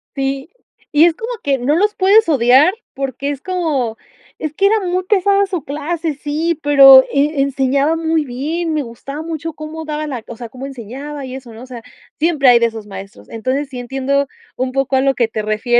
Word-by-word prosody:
Sí. 275 +2 -3 0.4
Y 300 +2 +6
es 340 -2 +2
como 455 +6 -5
que 275 -1 +1
no 260 +4 +1
los 415 +4 +1
puedes 400 +2 +4
odiar 265 +3 +5 0.2
porque 275 0 -3
es 280 -2 -6
como, 300 -11 -2 0.4
es 310 -1 -4
que 390 +5 +2
era 440 +2 +3
muy 365 0 -1
pesada 400 0 +2
su 360 -6 -4
clase, 310 +3 -3
sí, 300 +3 -2
pero 275 -2 +8
e 285 +1 +1
enseñaba 275 +2 +1
muy 325 -1 0
bien, 310 +7 -3
me 305 -2 0
gustaba 275 +5 -8
mucho 325 0 -5
cómo 315 +1 -7
daba 305 0 -3
la 255 -6 -5
o 235 - -9
sea, 235 -2 -8
cómo 265 +3 -8
enseñaba 275 +3 -7
y 255 - -8
eso, 260 -3 -9
¿no?, 225 +2 -11
o - - -9
sea, 250 -2 -9 0.4
siempre 300 -5 +3
hay 240 - +6
de 235 - +3
esos 225 -2 -8
maestros. 195 0 -10
Entonces, 260 +5 -2
sí 255 -2 -7
entiendo 270 +3 -1 0.3
un 255 0 -2
poco 270 0 0
a 260 - +3
lo 270 0 +2
que 235 - +1
te 220 -1 -4
refieres, 215 +3 +1
280 Hz, 210 wpm, -17 LUFS, 255-320 Hz, 0.4 s, pero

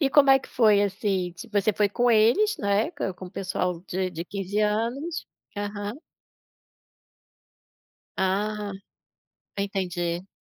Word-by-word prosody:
E 275 -3 +2
como 280 -1 +6
é 270 - +8
que - - -13
foi? 215 -4 +4
Assim, 195 -2 -1
tipo, 195 +5 -7
a - - +6
você 215 +2 +2
foi 205 +1 +2
com 240 +4 +2
eles, 235 - +4
né, 200 +6 +1
com 190 - -3
com 185 - -9
o - - -11
pessoal 180 -3 -2
de 185 0 -1
de 170 -1 -5
15 200 +2 -3
anos. 235 +11 -1 0.3
Aham. 205 +1 -4 2.2
Ah. 205 +2 0 0.8
Entendi. 180 -3 -2
205 Hz, 140 wpm, -26 LUFS, 190-220 Hz, 2.2 s, é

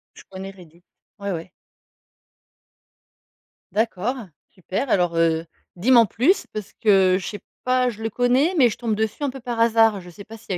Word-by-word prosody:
Je - - -14
connais 195 0 -8
Reddit. 175 -3 -18 0.4
Ouais, 200 0 -3
ouais. 170 0 -5 2.2
D'accord. 220 +2 -1 0.3
Super. 190 +8 -4
Alors, 175 -5 +2
heu, 165 0 +2 0.3
dis 200 +9 +1
m'en 235 -3 +7
plus 310 - +1
parce 210 -2 -8
que 190 -3 +4
je 185 - -7
sais 205 - -6 0.2
pas? 255 0 +2
Je 220 -1 -12
le 225 - -2
connais 250 - +2
mais 260 -5 +6
je - - -6
tombe 225 -3 -1
dessus 220 +5 -2
un 285 - +1
peu 270 +1 -8
par 240 -1 -4
hasard. 225 -3 +4
Je 180 - -12
sais 190 +4 -11
pas 225 0 -11
s'il 210 - -11
y - - -3
215 Hz, 185 wpm, -22 LUFS, 185-240 Hz, 2.2 s, m'en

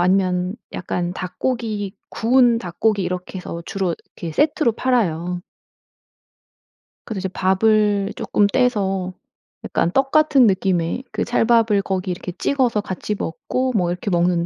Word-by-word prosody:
아니면 185 +1 +1 0.2
약간 180 -1 -3
닭고기 210 +1 -3
구운 240 0 +3
닭고기 205 +2 0
이렇게 180 +1 -4
해서 170 -2 -6
주로 190 -3 -1 0.2
이렇게 165 -2 -5
세트로 295 - +2
팔아요. 180 -9 0 1.7
그래서 220 -4 -4
이제 190 - -2
밥을 200 +2 +2
쪼끔 205 - +2
떼서 195 -6 0 0.5
약간 170 - 0
떡 270 +5 +1
같은 300 -5 +5
느낌의 190 +2 0
그 - - -2
찰밥을 225 -3 +3
거기 185 -1 -2
이렇게 180 0 -5
찍어서 245 -2 +1
같이 205 +2 -4
먹고 255 +10 -2
뭐 180 -4 +2
이렇게 180 +3 -3
먹는 175 -1 +2
195 Hz, 290 characters per minute, -21 LUFS, 180-230 Hz, 1.7 s, 같은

